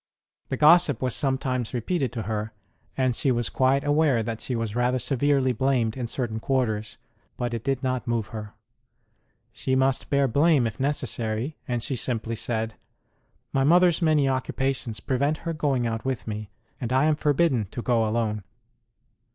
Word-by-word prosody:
The -, -, -2 dB
gossip 155 Hz, -4 st, +5 dB
was 130 Hz, -3 st, 0 dB
some 135 Hz, -3 st, +1 dB
times 130 Hz, -2 st, -2 dB
repeated 130 Hz, -, -1 dB
to 115 Hz, -, -3 dB
her, 110 Hz, +1 st, -3 dB, 0.4 s
and 130 Hz, -2 st, +1 dB
she 135 Hz, -, +2 dB
was 120 Hz, -6 st, -1 dB
quite 135 Hz, +4 st, +2 dB
aware 145 Hz, -5 st, +2 dB
that 115 Hz, 0 st, -4 dB
she 125 Hz, -, -2 dB
was 115 Hz, -2 st, -3 dB
rather 125 Hz, +1 st, +2 dB
severely 130 Hz, +1 st, +1 dB
blamed 125 Hz, -2 st, +1 dB
in 125 Hz, -3 st, -3 dB
certain 115 Hz, -2 st, -3 dB
quarters; 110 Hz, -4 st, -1 dB, 0.4 s
but 120 Hz, -1 st, -2 dB
it 115 Hz, -1 st, -3 dB
did 135 Hz, -1 st, -1 dB
not 130 Hz, -2 st, -1 dB
move 115 Hz, -3 st, -1 dB
her. 105 Hz, -2 st, -7 dB, 1.0 s
She 130 Hz, -, -1 dB
must 130 Hz, 0 st, +1 dB
bear 140 Hz, -1 st, +3 dB
blame, 145 Hz, +1 st, +3 dB
if 115 Hz, -, -4 dB
necessary; 130 Hz, -2 st, -1 dB
and 120 Hz, -3 st, -1 dB
she 135 Hz, -, -1 dB
simply 115 Hz, -2 st, -2 dB
said, 110 Hz, 0 st, -2 dB, 0.8 s
My 135 Hz, -, +2 dB
mother 175 Hz, +5 st, +6 dB
s 170 Hz, -, -2 dB
many 155 Hz, -4 st, +3 dB
occupations 130 Hz, -3 st, -2 dB
prevent 140 Hz, +5 st, -1 dB
her 165 Hz, -, -1 dB
going 140 Hz, -5 st, 0 dB
out 115 Hz, -1 st, -2 dB
with 130 Hz, -2 st, -3 dB
me, 105 Hz, -1 st, -5 dB, 0.3 s
and 120 Hz, -1 st, -4 dB
I 130 Hz, +3 st, +3 dB
am 155 Hz, -, +4 dB
forbidden 145 Hz, -, +1 dB
to 120 Hz, -, -6 dB
go 120 Hz, -3 st, +2 dB
alone. 110 Hz, -2 st, -1 dB
130 Hz, 175 wpm, -25 LUFS, 115-140 Hz, 1.0 s, mother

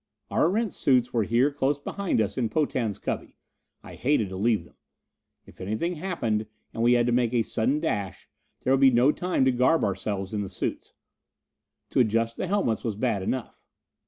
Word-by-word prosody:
Our -, -, +3 dB
Erentz 210 Hz, +3 st, -1 dB
suits 125 Hz, -2 st, +2 dB
were 115 Hz, -3 st, +1 dB
here 120 Hz, +7 st, +2 dB
close 140 Hz, 0 st, 0 dB
behind 180 Hz, -, -1 dB
us -, -, -2 dB
in 120 Hz, -4 st, 0 dB
Potan's 115 Hz, -6 st, -1 dB
cubby. -, -, -5 dB, 0.5 s
I -, -, -11 dB
hated 125 Hz, -6 st, +1 dB
to 95 Hz, -, -7 dB
leave 110 Hz, +2 st, +1 dB
them: -, -, -20 dB, 0.7 s
if -, -, -15 dB
anything 110 Hz, -, -2 dB
happened 115 Hz, -, -2 dB, 0.3 s
and 115 Hz, -, -3 dB
we 120 Hz, +1 st, +5 dB
had 120 Hz, -1 st, +3 dB
to 120 Hz, -, +1 dB
make 120 Hz, 0 st, +1 dB
a 115 Hz, -, +3 dB
sudden 130 Hz, +7 st, 0 dB
dash, 100 Hz, -, -3 dB, 0.3 s
there 130 Hz, -, +2 dB
would 135 Hz, -, +3 dB
be 135 Hz, -1 st, +7 dB
no 125 Hz, +3 st, +4 dB
time 175 Hz, -5 st, 0 dB
to 130 Hz, -, +4 dB
garb 130 Hz, +6 st, +3 dB
ourselves 100 Hz, 0 st, -2 dB
in 105 Hz, -, -1 dB
the 100 Hz, -, -4 dB
suits. -, -, -4 dB, 1.0 s
To -, -, +1 dB
adjust 115 Hz, 0 st, +2 dB
the -, -, -2 dB
helmets 180 Hz, -, 0 dB
was 115 Hz, -4 st, -2 dB
bad 110 Hz, -3 st, 0 dB
enough. 125 Hz, +6 st, -4 dB
120 Hz, 190 wpm, -26 LUFS, 110-140 Hz, 1.0 s, be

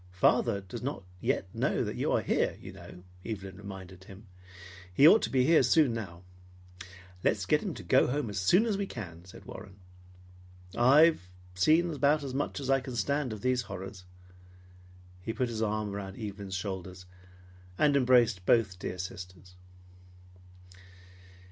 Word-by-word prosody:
"Father 100 Hz, +2 st, +3 dB
does 95 Hz, -1 st, -8 dB
not 95 Hz, -, -4 dB
know -, -, -24 dB
yet 95 Hz, -, -1 dB
that -, -, -1 dB
you -, -, -1 dB
are -, -, +1 dB
here, -, -, 0 dB
you -, -, -10 dB
know," 90 Hz, -, -12 dB, 0.2 s
Evelyn 95 Hz, -4 st, -6 dB
reminded 95 Hz, -2 st, -10 dB
him. 100 Hz, +2 st, -13 dB, 0.7 s
"He 135 Hz, +11 st, +6 dB
ought 220 Hz, -, +7 dB
to -, -, -1 dB
be 130 Hz, -1 st, +2 dB
here 165 Hz, +2 st, +5 dB
soon 130 Hz, +1 st, +3 dB
now." 90 Hz, -6 st, -7 dB, 1.0 s
"Let's -, -, +1 dB
get -, -, +2 dB
him -, -, -4 dB
to -, -, -9 dB
go -, -, +4 dB
home 140 Hz, 0 st, -1 dB
as 100 Hz, -, -3 dB
soon 180 Hz, -, +4 dB
as 210 Hz, -4 st, -1 dB
we 200 Hz, -, -2 dB
can," 85 Hz, -, -8 dB
said 95 Hz, -, -14 dB
Warren. 95 Hz, -1 st, -10 dB, 1.0 s
"I've 135 Hz, -, +5 dB, 0.2 s
seen 160 Hz, -, +3 dB
about 145 Hz, +1 st, +2 dB
all 135 Hz, 0 st, -3 dB
I 135 Hz, -, +4 dB
can 130 Hz, -1 st, -7 dB
stand 140 Hz, +3 st, -1 dB
of 105 Hz, -2 st, -7 dB
these 130 Hz, +1 st, +1 dB
horrors." 95 Hz, -3 st, -8 dB, 1.2 s
He 115 Hz, +4 st, -4 dB
put 125 Hz, 0 st, -1 dB
his 110 Hz, -2 st, -4 dB
arm 105 Hz, -1 st, -1 dB
around 95 Hz, -1 st, -7 dB
Evelyn's 100 Hz, -3 st, -6 dB
shoulders 95 Hz, -1 st, -6 dB, 0.7 s
and 145 Hz, -1 st, +3 dB
embraced 120 Hz, -7 st, +3 dB
both 95 Hz, -3 st, +2 dB
dear 90 Hz, -, -5 dB
sisters. 90 Hz, 0 st, -8 dB
110 Hz, 155 wpm, -30 LUFS, 95-135 Hz, 1.2 s, ought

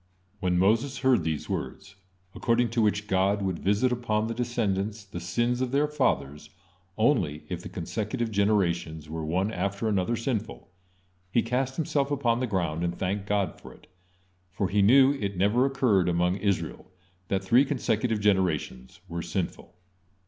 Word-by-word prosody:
When 90 Hz, -1 st, +1 dB
Moses 115 Hz, +9 st, +2 dB
heard 125 Hz, -9 st, +4 dB
these 80 Hz, -2 st, -2 dB
words, 100 Hz, -, -5 dB, 0.4 s
according 115 Hz, -1 st, +1 dB
to 115 Hz, 0 st, +1 dB
which 105 Hz, -1 st, +1 dB
God 100 Hz, +1 st, +1 dB
would 95 Hz, -3 st, -2 dB
visit 105 Hz, +6 st, +2 dB
upon 110 Hz, -3 st, 0 dB
the 115 Hz, -, -3 dB
descendants 110 Hz, -3 st, -2 dB
the 100 Hz, -3 st, -8 dB
sins 120 Hz, +8 st, -1 dB
of 130 Hz, -, 0 dB
their 145 Hz, +2 st, +2 dB
fathers 125 Hz, -, -1 dB, 0.5 s
only 105 Hz, -, +1 dB
if 90 Hz, -2 st, -4 dB
the -, -, -8 dB
consecutive 110 Hz, +6 st, -3 dB
generations 85 Hz, -7 st, 0 dB
were 80 Hz, 0 st, -4 dB
one 90 Hz, +7 st, 0 dB
after 100 Hz, +3 st, -2 dB
another 100 Hz, +2 st, +1 dB
sinful, 110 Hz, -4 st, -4 dB, 0.6 s
he 115 Hz, +5 st, +2 dB
cast 125 Hz, +3 st, -1 dB
himself 145 Hz, -3 st, 0 dB
upon 125 Hz, -5 st, +1 dB
the 130 Hz, -, -1 dB
ground 85 Hz, -5 st, -1 dB
and 85 Hz, 0 st, -2 dB
thanked 100 Hz, +2 st, -2 dB
God 100 Hz, -4 st, -1 dB
for -, -, -12 dB
it; -, -, -20 dB, 0.6 s
for 95 Hz, +1 st, -2 dB
he 100 Hz, +2 st, +2 dB
knew 135 Hz, +6 st, +6 dB
it 100 Hz, -9 st, -4 dB
never 105 Hz, +8 st, +3 dB
occurred 120 Hz, -10 st, +2 dB
among 90 Hz, +2 st, +1 dB
Israel 95 Hz, -6 st, -2 dB, 0.4 s
that 95 Hz, 0 st, -1 dB
three 120 Hz, +7 st, +5 dB
consecutive 120 Hz, -5 st, 0 dB
generations 90 Hz, -11 st, 0 dB
were 85 Hz, 0 st, -4 dB
sinful. 85 Hz, +1 st, -4 dB
100 Hz, 160 wpm, -27 LUFS, 90-120 Hz, 0.6 s, knew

